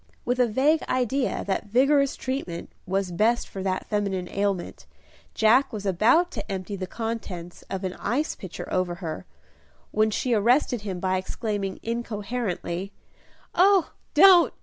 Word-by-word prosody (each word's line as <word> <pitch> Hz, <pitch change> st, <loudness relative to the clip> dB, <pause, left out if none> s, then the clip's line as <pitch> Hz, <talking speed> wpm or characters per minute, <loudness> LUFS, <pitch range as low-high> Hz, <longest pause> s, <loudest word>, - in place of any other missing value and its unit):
With 245 Hz, +1 st, 0 dB
a 250 Hz, -, +5 dB
vague 280 Hz, +8 st, +2 dB
idea 255 Hz, +1 st, 0 dB
that 200 Hz, +1 st, -2 dB
vigorous 275 Hz, +5 st, +3 dB
treatment 255 Hz, -11 st, -4 dB, 0.2 s
was 190 Hz, -1 st, -1 dB
best 220 Hz, +7 st, +2 dB
for 195 Hz, -, -7 dB
that 185 Hz, -1 st, -2 dB
feminine 195 Hz, -4 st, -1 dB
ailment, 200 Hz, -3 st, -2 dB, 0.5 s
Jack 240 Hz, +6 st, +4 dB
was 210 Hz, -3 st, -6 dB
about 235 Hz, -, +3 dB
to 205 Hz, -4 st, -6 dB
empty 190 Hz, +1 st, -4 dB
the 185 Hz, -1 st, -5 dB
contents 200 Hz, -7 st, -5 dB
of 190 Hz, 0 st, -4 dB
an 185 Hz, -1 st, -2 dB
ice 260 Hz, +9 st, -1 dB
pitcher 185 Hz, -3 st, -8 dB
over 180 Hz, -1 st, 0 dB
her, 170 Hz, -1 st, -6 dB, 0.6 s
when 215 Hz, +1 st, +3 dB
she 240 Hz, +3 st, 0 dB
arrested 240 Hz, +2 st, +3 dB
him, 195 Hz, -4 st, -4 dB
by 185 Hz, 0 st, 0 dB
exclaiming, 200 Hz, 0 st, -3 dB
incoherently, 210 Hz, -5 st, -3 dB, 0.6 s
"Oh, 380 Hz, -1 st, +4 dB, 0.2 s
don't! 370 Hz, -3 st, +8 dB
210 Hz, 145 wpm, -25 LUFS, 190-250 Hz, 0.6 s, don't